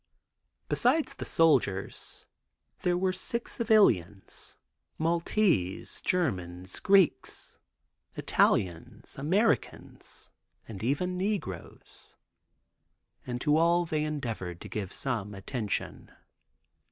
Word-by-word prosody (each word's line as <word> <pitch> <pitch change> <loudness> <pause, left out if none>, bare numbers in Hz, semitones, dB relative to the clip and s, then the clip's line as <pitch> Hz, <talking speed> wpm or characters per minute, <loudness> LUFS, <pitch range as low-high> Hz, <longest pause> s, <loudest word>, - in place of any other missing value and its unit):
Besides 275 +3 +2
the - - -7
soldiers, 135 -12 +1 0.5
there 175 0 +1
were 185 0 +1
sick 235 +5 -3
civilians, 120 - +2 0.4
Maltese, 165 - +1
Germans, 95 - -2
Greeks, 195 -5 +2 0.6
Italians, 100 +8 0
Americans 195 +10 -1 0.4
and 105 -4 -8
even 180 +10 0
negroes, 185 - -5 1.1
and 125 -1 -3
to 150 +2 +3
all 170 +1 +4
they 155 -2 -1
endeavored 115 - -4
to - - -7
give 100 -3 -4
some 110 -7 -3
attention. 105 +2 -3
145 Hz, 85 wpm, -29 LUFS, -, 1.1 s, all